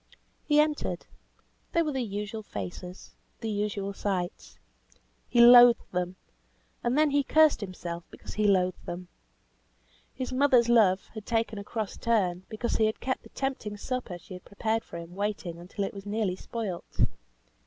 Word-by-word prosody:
He 295 Hz, -1 st, +5 dB
entered. 300 Hz, -1 st, 0 dB, 0.7 s
There 335 Hz, -1 st, +3 dB
were 305 Hz, -, -1 dB
the 265 Hz, -2 st, -1 dB
usual 210 Hz, 0 st, -4 dB
faces, 180 Hz, -, -7 dB, 0.3 s
the 225 Hz, -, -3 dB
usual 205 Hz, -1 st, -2 dB
sights. 185 Hz, -3 st, -3 dB, 0.7 s
He 240 Hz, -, +2 dB
loathed 240 Hz, 0 st, +8 dB
them, 180 Hz, 0 st, -2 dB, 0.7 s
and 245 Hz, +3 st, +1 dB
then 305 Hz, -1 st, +4 dB
he 285 Hz, 0 st, +3 dB
cursed 310 Hz, -1 st, +4 dB
himself 175 Hz, -3 st, -5 dB
because -, -, -10 dB
he 210 Hz, 0 st, +2 dB
loathed 185 Hz, -2 st, +2 dB
them. 175 Hz, +1 st, -6 dB, 1.0 s
His 260 Hz, -1 st, -5 dB
mother's 255 Hz, -3 st, +4 dB
love 200 Hz, -5 st, +4 dB
had 215 Hz, -2 st, -8 dB
taken 225 Hz, -2 st, 0 dB
a -, -, -6 dB
cross 215 Hz, -1 st, -4 dB
turn, 190 Hz, -6 st, 0 dB
because 225 Hz, +2 st, -2 dB
he 220 Hz, -, +4 dB
had 220 Hz, -, -3 dB
kept 260 Hz, -, -2 dB
the -, -, -16 dB
tempting 255 Hz, -6 st, -3 dB
supper 245 Hz, -4 st, -4 dB
she 180 Hz, -, -12 dB
had 180 Hz, -, -9 dB
prepared 220 Hz, +2 st, -1 dB
for -, -, -9 dB
him 170 Hz, +1 st, -9 dB
waiting 195 Hz, -4 st, -3 dB
until 185 Hz, +3 st, -4 dB
it -, -, -5 dB
was 200 Hz, 0 st, -9 dB
nearly 205 Hz, -3 st, 0 dB
spoilt. 195 Hz, -3 st, -5 dB
210 Hz, 165 wpm, -28 LUFS, 185-240 Hz, 1.0 s, loathed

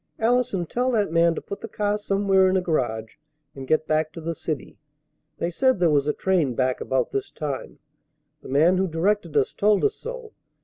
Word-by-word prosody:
"Allison, 235 Hz, -5 st, +1 dB
tell 245 Hz, +9 st, -1 dB
that 205 Hz, -6 st, +1 dB
man 170 Hz, 0 st, +3 dB
to -, -, -4 dB
put 200 Hz, -, -8 dB
the -, -, -6 dB
car 210 Hz, -1 st, -1 dB
somewhere 195 Hz, -2 st, +2 dB
in 190 Hz, -, +2 dB
a -, -, +1 dB
garage 115 Hz, -10 st, -2 dB, 0.4 s
and 135 Hz, -1 st, -9 dB
get 155 Hz, +2 st, +2 dB
back 155 Hz, 0 st, 0 dB
to 170 Hz, -, -8 dB
the 165 Hz, +1 st, -3 dB
city. 155 Hz, -2 st, -5 dB, 0.6 s
They 170 Hz, -, -2 dB
said 260 Hz, +4 st, +2 dB
there 170 Hz, -3 st, +3 dB
was 145 Hz, -1 st, +2 dB
a -, -, +3 dB
train 165 Hz, -8 st, 0 dB
back 130 Hz, 0 st, 0 dB
about 130 Hz, -2 st, -1 dB
this 135 Hz, -, -3 dB
time. 145 Hz, -4 st, -5 dB, 0.6 s
The -, -, -11 dB
man 160 Hz, +7 st, +4 dB
who 190 Hz, -, +1 dB
directed 170 Hz, -1 st, 0 dB
us 135 Hz, -, +2 dB
told 210 Hz, 0 st, +2 dB
us 425 Hz, -, +2 dB
so. 480 Hz, -1 st, -8 dB
170 Hz, 205 wpm, -24 LUFS, 150-205 Hz, 0.6 s, man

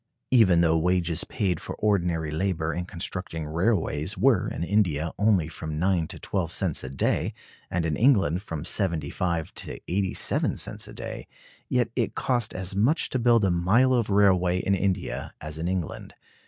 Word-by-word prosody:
Even 95 Hz, -9 st, +5 dB
though 80 Hz, -1 st, +3 dB
wages 85 Hz, -1 st, +1 dB
paid 95 Hz, -8 st, -1 dB
for -, -, -6 dB
ordinary 85 Hz, -7 st, 0 dB
labor 80 Hz, -1 st, -1 dB
in 90 Hz, -, -3 dB
constructing 90 Hz, -3 st, -5 dB
railways 85 Hz, +1 st, 0 dB
were 115 Hz, -1 st, +3 dB
in -, -, -4 dB
India 85 Hz, -5 st, +1 dB
only 100 Hz, -6 st, +3 dB
from 80 Hz, -1 st, -5 dB
nine 90 Hz, -1 st, +1 dB
to -, -, -7 dB
twelve 90 Hz, -4 st, -2 dB
cents -, -, 0 dB
a 65 Hz, -, -5 dB
day, 65 Hz, -, -1 dB, 0.3 s
and 85 Hz, -1 st, -1 dB
in 80 Hz, -2 st, 0 dB
England 100 Hz, -, +3 dB
from 80 Hz, -6 st, -6 dB
seventy 85 Hz, -5 st, 0 dB
five 85 Hz, -3 st, -2 dB
to -, -, -7 dB
eighty 95 Hz, +1 st, -1 dB
seven -, -, +1 dB
cents -, -, -3 dB
a -, -, -10 dB
day, -, -, -7 dB, 0.4 s
yet 120 Hz, -3 st, +1 dB
it 120 Hz, -3 st, -1 dB
cost 120 Hz, -4 st, 0 dB
as 95 Hz, +1 st, -4 dB
much 125 Hz, -, +2 dB
to 130 Hz, -, 0 dB
build 115 Hz, -3 st, +4 dB
a 95 Hz, -, +2 dB
mile 100 Hz, +10 st, +3 dB
of 120 Hz, -4 st, +1 dB
railway 95 Hz, -3 st, +3 dB
in 95 Hz, +1 st, 0 dB
India 95 Hz, -1 st, -2 dB
as 75 Hz, +1 st, -6 dB
in 85 Hz, -, -2 dB
England. 90 Hz, -4 st, -4 dB
90 Hz, 180 wpm, -26 LUFS, 80-105 Hz, 0.4 s, Even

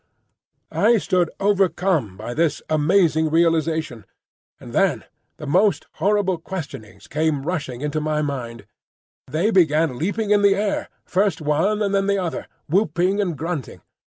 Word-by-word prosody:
I 235 Hz, 0 st, +3 dB
stood 180 Hz, -4 st, +1 dB
overcome 185 Hz, -, +1 dB
by 110 Hz, +4 st, -6 dB
this 160 Hz, +2 st, 0 dB
amazing 160 Hz, 0 st, +3 dB
realisation 160 Hz, -, 0 dB, 0.5 s
and -, -, -11 dB
then -, -, +2 dB, 0.3 s
the -, -, -8 dB
most 185 Hz, +3 st, +2 dB
horrible 200 Hz, -3 st, +1 dB
questionings 155 Hz, -, -8 dB
came 150 Hz, -2 st, 0 dB
rushing 140 Hz, -7 st, -3 dB
into 150 Hz, +1 st, -2 dB
my 150 Hz, 0 st, 0 dB
mind. 120 Hz, -5 st, -5 dB, 0.6 s
They 165 Hz, +11 st, 0 dB
began 155 Hz, -, +2 dB
leaping 205 Hz, +5 st, -1 dB
in 205 Hz, -1 st, +5 dB
the 200 Hz, -1 st, +5 dB
air, 205 Hz, 0 st, -1 dB, 0.2 s
first 195 Hz, -2 st, +1 dB
one 165 Hz, +8 st, +1 dB
and 200 Hz, -1 st, -1 dB
then 195 Hz, 0 st, +1 dB
the 200 Hz, 0 st, +2 dB
other, 180 Hz, -4 st, -3 dB, 0.2 s
whooping 185 Hz, +3 st, +1 dB
and 175 Hz, -6 st, -2 dB
grunting. 160 Hz, -3 st, -5 dB
165 Hz, 140 wpm, -22 LUFS, 150-195 Hz, 0.6 s, in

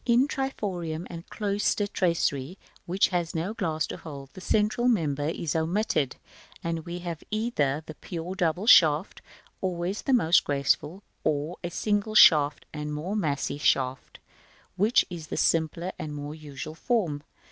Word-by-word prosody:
In 245 Hz, +3 st, +4 dB
triforium 185 Hz, -, -3 dB
and 170 Hz, -1 st, -9 dB
cloister 205 Hz, 0 st, 0 dB
tracery, 170 Hz, -5 st, 0 dB, 0.3 s
which 185 Hz, +3 st, +2 dB
has 175 Hz, -3 st, -2 dB
no 170 Hz, +6 st, -2 dB
glass 160 Hz, -8 st, -1 dB
to -, -, -6 dB
hold, 140 Hz, -4 st, -9 dB
the 185 Hz, -, -10 dB
central 215 Hz, +5 st, +1 dB
member 150 Hz, -, +1 dB
is 165 Hz, -2 st, -3 dB
omitted, 160 Hz, -, 0 dB, 0.5 s
and 165 Hz, 0 st, -3 dB
we 170 Hz, +1 st, -4 dB
have 175 Hz, -3 st, -6 dB
either 160 Hz, -, 0 dB
the 155 Hz, -, -8 dB
pure 170 Hz, +3 st, -6 dB
double 180 Hz, 0 st, 0 dB
shaft, 160 Hz, -5 st, +5 dB, 0.4 s
always 185 Hz, +2 st, -2 dB
the 270 Hz, -, 0 dB
most 175 Hz, -8 st, +5 dB
graceful, 145 Hz, +6 st, 0 dB, 0.2 s
or 155 Hz, +3 st, -1 dB
a 175 Hz, -, -2 dB
single 210 Hz, +3 st, -1 dB, 0.6 s
and 150 Hz, -1 st, -4 dB
more 175 Hz, +8 st, -3 dB
massy 145 Hz, -7 st, -1 dB
shaft, 130 Hz, -2 st, 0 dB, 0.6 s
which 210 Hz, +6 st, +3 dB
is 165 Hz, -3 st, -7 dB
the -, -, -4 dB
simpler 165 Hz, +2 st, +1 dB
and 155 Hz, -3 st, -5 dB
more 145 Hz, 0 st, -5 dB
usual 150 Hz, -1 st, -8 dB
form. 165 Hz, -, -1 dB
170 Hz, 145 wpm, -27 LUFS, 155-200 Hz, 0.6 s, shaft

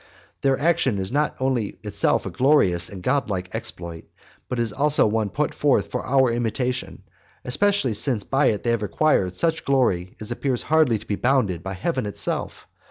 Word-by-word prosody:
And -, -, -28 dB
their 135 Hz, -1 st, +2 dB
action 140 Hz, -8 st, +2 dB
is 95 Hz, +1 st, -3 dB
not 150 Hz, +2 st, 0 dB
only 130 Hz, -6 st, 0 dB
of -, -, -23 dB
itself -, -, 0 dB
a -, -, -4 dB
glorious 110 Hz, -, +2 dB
and 95 Hz, -2 st, -9 dB
godlike 95 Hz, -10 st, -1 dB
exploit, 85 Hz, -1 st, -6 dB, 0.4 s
but 125 Hz, -, -2 dB
it 120 Hz, -, +2 dB
is 110 Hz, -2 st, -2 dB
also 150 Hz, +3 st, +3 dB
one 110 Hz, -1 st, 0 dB
put -, -, -1 dB
forth -, -, +1 dB
for -, -, -3 dB
our 130 Hz, -2 st, +3 dB
imitation, 125 Hz, +2 st, -2 dB, 0.4 s
especially 195 Hz, -, +2 dB
since 110 Hz, 0 st, 0 dB
by 135 Hz, +5 st, +2 dB
it 105 Hz, -3 st, 0 dB
they 120 Hz, -, +1 dB
have 115 Hz, -2 st, 0 dB
acquired 105 Hz, -5 st, +1 dB
such 165 Hz, -, 0 dB
glory 95 Hz, -10 st, +1 dB
as 110 Hz, +2 st, -5 dB
appears 125 Hz, 0 st, -1 dB
hardly 155 Hz, -7 st, +3 dB
to -, -, -13 dB
be 100 Hz, -, -2 dB
bounded 120 Hz, -10 st, +1 dB
by 95 Hz, +2 st, -5 dB
heaven 130 Hz, -, -2 dB
itself. 100 Hz, -, -4 dB
120 Hz, 190 wpm, -23 LUFS, 100-135 Hz, 0.4 s, also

